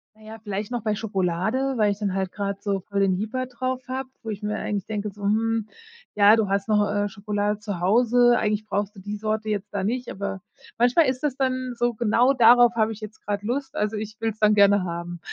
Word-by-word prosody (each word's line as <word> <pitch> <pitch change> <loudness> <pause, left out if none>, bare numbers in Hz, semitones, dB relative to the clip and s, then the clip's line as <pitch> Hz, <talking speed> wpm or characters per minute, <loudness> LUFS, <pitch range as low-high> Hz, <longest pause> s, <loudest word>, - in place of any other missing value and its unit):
Na 215 - -22
ja, 220 +1 -9
vielleicht 205 +2 -4
noch 240 -2 -2
bei 215 -2 0
Schokolade, 205 +6 -1
weil 210 -2 +3
ich 200 - -5
dann 200 -3 -1
halt 190 -1 -2
gerade 200 -1 -3
so 200 -2 -1
voll 200 +2 -4
den 190 -2 +3
Jieper 225 +6 -3
drauf 255 +1 -3
habe, 260 0 -4
wo 225 - -6
ich 205 0 -6
mir 210 0 -2
eigentlich 200 -2 -3
denke, 210 -1 -3
so: 205 +1 -13
„Hm, 220 +1 +1 0.5
ja, 205 +1 +7
du 220 -3 0
hast 195 +1 0
noch, 210 -1 +2
äh, 205 0 0
Schokolade 205 0 -2
zu 205 -4 -5
Hause, 240 +5 +4
eigentlich 210 -1 -1
brauchst 205 0 -2
du 195 - -11
die 205 +2 -5
Sorte 215 +1 -2
jetzt 205 -1 -2
da 200 -2 -2
nicht“, 245 +4 -2
aber 195 0 -5 0.4
manchmal 245 +8 +4
ist 255 -1 -1
das 285 -4 0
dann 255 -1 -1
so: 240 0 0
Genau 235 +4 +3
darauf 240 -1 +6
habe 220 -1 +2
ich 220 0 -9
jetzt 215 0 -9
gerade 205 0 -3
Lust, 265 +4 -3
also 210 -4 -1
ich 215 0 -6
will's 225 -1 -3
dann 210 0 +4
gerne 200 -1 +5
haben. 170 0 -5
215 Hz, 230 wpm, -24 LUFS, 200-235 Hz, 0.5 s, ja